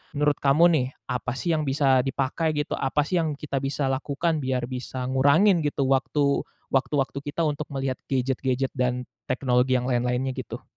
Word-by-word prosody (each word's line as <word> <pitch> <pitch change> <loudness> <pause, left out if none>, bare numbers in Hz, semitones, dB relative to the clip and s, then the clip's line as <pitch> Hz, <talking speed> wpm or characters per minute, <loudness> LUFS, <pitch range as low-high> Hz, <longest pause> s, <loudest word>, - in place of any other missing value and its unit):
menurut 150 0 +1
kamu 140 +4 +4
nih 140 -6 +2 0.2
apa 125 0 -2
sih 170 +5 -1
yang 155 -2 0
bisa 135 -1 +3
dipakai 135 +4 -1
gitu? 145 -1 -2
Apa 140 +2 +1
sih 175 +4 0
yang 155 -3 -1
kita 140 -1 -3
bisa 135 0 -1
lakukan 150 +4 -1
biar 130 -2 -2
bisa 130 0 -5
ngurangin 140 +9 +4
gitu 145 -1 -1
waktu 140 +1 +2 0.3
waktu-waktu 135 0 0
kita 150 +3 -1
untuk 150 -1 -1
melihat 135 -1 -2
gadget-gadget 130 0 0
dan 125 -1 -1 0.2
teknologi 130 0 +2
yang 125 - +1
lain-lainnya 125 +2 0
gitu? 130 -2 -7
135 Hz, 165 wpm, -25 LUFS, 130-150 Hz, 0.3 s, kamu